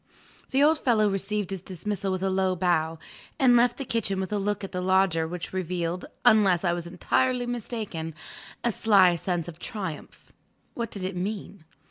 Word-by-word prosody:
The 270 Hz, +2 st, +3 dB
old 310 Hz, +1 st, +4 dB
fellow 220 Hz, -4 st, +3 dB
received 195 Hz, 0 st, -2 dB
his 190 Hz, -2 st, -4 dB
dismissal 195 Hz, +2 st, -3 dB
with 185 Hz, 0 st, -2 dB
a 195 Hz, -, +1 dB
low 190 Hz, -1 st, +1 dB
bow, 165 Hz, -2 st, +1 dB, 0.4 s
and 250 Hz, -2 st, +5 dB
left 240 Hz, 0 st, +4 dB
the 275 Hz, -, -4 dB
kitchen 200 Hz, -5 st, -1 dB
with 190 Hz, +2 st, -3 dB
a 205 Hz, -, +1 dB
look 205 Hz, +1 st, -1 dB
at 195 Hz, -, -5 dB
the 180 Hz, -, -3 dB
Lodger 185 Hz, -3 st, +2 dB
which 175 Hz, +1 st, -6 dB
revealed 180 Hz, -1 st, -2 dB, 0.2 s
(unless 205 Hz, -7 st, +5 dB
I 175 Hz, -2 st, +2 dB
was 175 Hz, -1 st, -4 dB
entirely 245 Hz, +8 st, +1 dB
mistaken) 215 Hz, -9 st, -4 dB, 0.5 s
a 240 Hz, -, +2 dB
sly 195 Hz, -5 st, +5 dB
sense 175 Hz, -1 st, -2 dB
of 170 Hz, -1 st, -9 dB
triumph. 190 Hz, -8 st, -7 dB, 0.4 s
What 235 Hz, -2 st, -3 dB
did 200 Hz, -4 st, -7 dB
it 185 Hz, 0 st, -3 dB
mean? 195 Hz, -2 st, -5 dB
190 Hz, 180 wpm, -26 LUFS, 180-215 Hz, 0.5 s, and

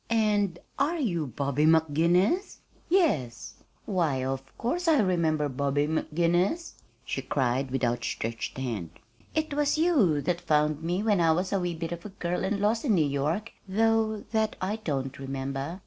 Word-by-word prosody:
"And 210 Hz, -5 st, +2 dB, 0.2 s
are 310 Hz, +5 st, +1 dB
you 175 Hz, -, -1 dB
Bobby 140 Hz, +4 st, 0 dB
McGinnis?" 170 Hz, -, +3 dB, 0.3 s
"Yes." 135 Hz, -, +1 dB, 0.3 s
"Why, 160 Hz, -10 st, 0 dB
of 135 Hz, 0 st, -2 dB, 0.2 s
course 340 Hz, +9 st, -2 dB
I 320 Hz, -2 st, +5 dB
remember 165 Hz, -7 st, +2 dB
Bobby 140 Hz, +1 st, 0 dB
McGinnis," 175 Hz, -, 0 dB, 0.3 s
she -, -, -3 dB
cried, 130 Hz, 0 st, 0 dB
with 135 Hz, +1 st, -2 dB
outstretched 115 Hz, -1 st, -2 dB
hand. 115 Hz, -10 st, -3 dB, 0.5 s
"It 310 Hz, -2 st, 0 dB
was 295 Hz, +1 st, +1 dB
you 275 Hz, -, +3 dB
that 175 Hz, +4 st, -1 dB
found 150 Hz, 0 st, +1 dB
me 175 Hz, +5 st, -1 dB
when 205 Hz, -5 st, +3 dB
I 165 Hz, -1 st, +4 dB
was 185 Hz, +4 st, -1 dB
a 195 Hz, -, +2 dB
wee 175 Hz, -2 st, -2 dB
bit 165 Hz, 0 st, -4 dB
of 170 Hz, 0 st, -5 dB
a -, -, -7 dB
girl 180 Hz, -2 st, -3 dB
and 200 Hz, +1 st, 0 dB
lost 215 Hz, +3 st, +1 dB
in 230 Hz, -8 st, +3 dB
New 160 Hz, -4 st, +3 dB
York, 150 Hz, +10 st, -1 dB, 0.2 s
though 220 Hz, +1 st, +2 dB
that 220 Hz, -1 st, +1 dB
I 200 Hz, +4 st, -2 dB
don't 140 Hz, -11 st, -3 dB
remember. 135 Hz, +4 st, -4 dB
170 Hz, 165 wpm, -28 LUFS, 140-215 Hz, 0.5 s, I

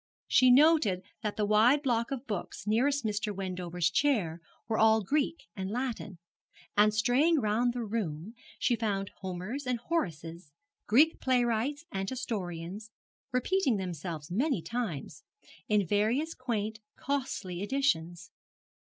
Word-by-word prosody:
She 255 Hz, -, +5 dB
noted 250 Hz, -, +5 dB, 0.2 s
that 210 Hz, -3 st, -3 dB
the 210 Hz, -, +1 dB
wide 230 Hz, +8 st, +4 dB
block 235 Hz, -3 st, +1 dB
of 270 Hz, -1 st, -4 dB
books 210 Hz, -2 st, -5 dB
nearest 255 Hz, +5 st, +1 dB
Mr. 210 Hz, 0 st, -1 dB
Wendover's 180 Hz, -3 st, -2 dB
chair 185 Hz, -, +1 dB, 0.3 s
were 220 Hz, -1 st, 0 dB
all 220 Hz, -1 st, +5 dB
Greek 300 Hz, -, -1 dB
and 190 Hz, 0 st, -4 dB
Latin; 235 Hz, -5 st, -3 dB, 0.6 s
and 210 Hz, +1 st, +5 dB
straying 255 Hz, +10 st, +3 dB
round 230 Hz, +2 st, +1 dB
the 245 Hz, -1 st, -3 dB
room 205 Hz, -4 st, -3 dB, 0.2 s
she 245 Hz, -, +2 dB
found 200 Hz, -4 st, -2 dB
Homers 190 Hz, +9 st, -5 dB
and 250 Hz, -1 st, +1 dB
Horaces, 170 Hz, -, -4 dB, 0.3 s
Greek 295 Hz, +9 st, +4 dB
playwrights 250 Hz, +3 st, +1 dB
and 195 Hz, 0 st, -2 dB
historians, 205 Hz, -5 st, -5 dB, 0.4 s
repeating 255 Hz, -, +1 dB
themselves 170 Hz, -3 st, -5 dB
many 240 Hz, -, 0 dB
times, 165 Hz, -, -4 dB, 0.5 s
in 210 Hz, -2 st, +3 dB
various 225 Hz, -, +1 dB
quaint 220 Hz, -4 st, -3 dB, 0.2 s
costly 250 Hz, -10 st, -3 dB
editions. 185 Hz, -8 st, -1 dB
220 Hz, 125 wpm, -30 LUFS, 185-255 Hz, 0.6 s, She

